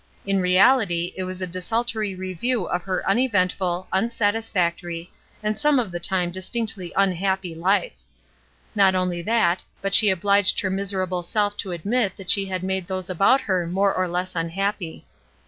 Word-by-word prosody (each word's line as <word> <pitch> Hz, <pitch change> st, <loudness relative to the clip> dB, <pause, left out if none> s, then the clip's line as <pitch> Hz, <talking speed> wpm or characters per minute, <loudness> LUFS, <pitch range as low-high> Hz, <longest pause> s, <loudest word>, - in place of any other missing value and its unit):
In 195 Hz, -1 st, +1 dB
reality 180 Hz, -1 st, +3 dB
it 185 Hz, -, -3 dB
was 185 Hz, 0 st, -5 dB
a -, -, +1 dB
desultory 210 Hz, +3 st, -2 dB
review 185 Hz, +4 st, -2 dB
of 180 Hz, -, -2 dB
her 185 Hz, +1 st, -3 dB
uneventful, 185 Hz, -5 st, +1 dB
unsatisfactory, 190 Hz, -5 st, -1 dB, 0.3 s
and 215 Hz, 0 st, -1 dB
some 295 Hz, -1 st, +3 dB
of 230 Hz, -7 st, -1 dB
the 175 Hz, -, -4 dB
time 180 Hz, 0 st, 0 dB
distinctly 185 Hz, 0 st, -3 dB
unhappy 190 Hz, -1 st, 0 dB
life. 190 Hz, -, +1 dB, 0.8 s
Not 195 Hz, -3 st, +4 dB
only 180 Hz, -2 st, -1 dB
that, 185 Hz, -3 st, +1 dB, 0.2 s
but 195 Hz, 0 st, -3 dB
she 215 Hz, -, +8 dB
obhged 200 Hz, +2 st, +3 dB
her 190 Hz, -, 0 dB
miserable 190 Hz, -2 st, -1 dB
self 205 Hz, +3 st, 0 dB
to 195 Hz, -, -4 dB
admit 200 Hz, +4 st, -1 dB
that 190 Hz, -2 st, -2 dB
she 195 Hz, -1 st, +2 dB
had 185 Hz, -1 st, -3 dB
made 190 Hz, -1 st, -2 dB
those 185 Hz, -1 st, -3 dB
about 195 Hz, +9 st, +4 dB
her 185 Hz, -4 st, -1 dB
more 195 Hz, +3 st, +1 dB
or 185 Hz, 0 st, 0 dB
less 180 Hz, +1 st, -3 dB
unhappy. 175 Hz, +1 st, -3 dB
190 Hz, 160 wpm, -23 LUFS, 180-205 Hz, 0.8 s, she